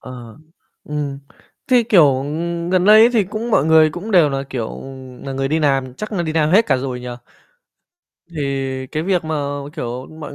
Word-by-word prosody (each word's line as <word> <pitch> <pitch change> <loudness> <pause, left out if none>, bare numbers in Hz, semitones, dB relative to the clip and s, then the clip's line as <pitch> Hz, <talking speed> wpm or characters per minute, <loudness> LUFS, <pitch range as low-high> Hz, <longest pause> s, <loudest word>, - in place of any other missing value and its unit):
Ờ, 120 -3 -11 0.5
ừm, 145 -2 -4 0.5
thế, 250 -2 +4
kiểu, 165 - +4
ừm, 170 +4 -4
gần 185 -1 +2
đây 215 +1 +7
ấy, 230 +2 +6
thì 220 -4 +2
cũng 215 +5 -5
mọi 150 - +3
người 160 -1 +5
cũng 180 +8 -7
đều 170 -7 +4
là, 135 0 -2
kiểu, 120 -4 -5 0.4
nà 135 - -5
người 135 0 -2
đi 155 +3 +1
làm 135 -4 0
chắc 215 +10 -7
là 180 - -1
đi 160 -2 -3
làm 155 -1 +1
hết 210 +6 +4
cả 135 - +2
rồi 130 -1 -4
nhỉ? 125 - -7 1.3
Thì 135 -2 -3
cái 155 +4 -4
việc 180 -2 0
mà, 160 0 -3 0.4
kiểu, 125 -2 -5
mọi 150 -2 -8
155 Hz, 195 wpm, -19 LUFS, 135-180 Hz, 1.3 s, đây